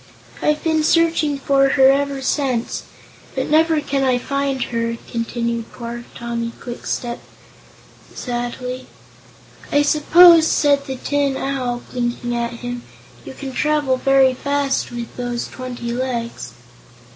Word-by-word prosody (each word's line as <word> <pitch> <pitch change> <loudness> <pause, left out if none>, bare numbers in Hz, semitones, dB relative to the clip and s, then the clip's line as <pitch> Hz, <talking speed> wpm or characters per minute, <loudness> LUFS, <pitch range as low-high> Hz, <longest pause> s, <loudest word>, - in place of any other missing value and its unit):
I've 300 0 +1
been 320 -1 +2
searching 325 -2 +2
for 275 0 +3
her 265 0 +6
ever 280 -1 -1
since, 260 -4 -1 0.5
but - - 0
never 320 0 +4
can 280 -1 -1
I 255 -2 +3
find 275 +1 -1
her," 230 0 -1
continued 235 0 -3
poor 235 0 -7
Tommy 235 -1 -4
Kwikstep, 240 0 -4 0.9
sadly. 250 +1 -4 0.8
"I 290 0 +4
suppose," 325 +3 +7
said 285 -1 +2
the 265 - -3
Tin 280 +1 0
Owl, 255 -3 -2
blinking 240 -1 -2
at 235 0 -3
him, 245 0 -4 0.4
"you - - -9
can 275 -1 -6
travel 295 -2 +1
very 270 0 +4
fast, 280 +1 -1
with 240 -1 -6
those 245 -1 -3
twenty 245 -2 -6
legs." 235 - -4
260 Hz, 125 wpm, -20 LUFS, 240-285 Hz, 0.9 s, suppose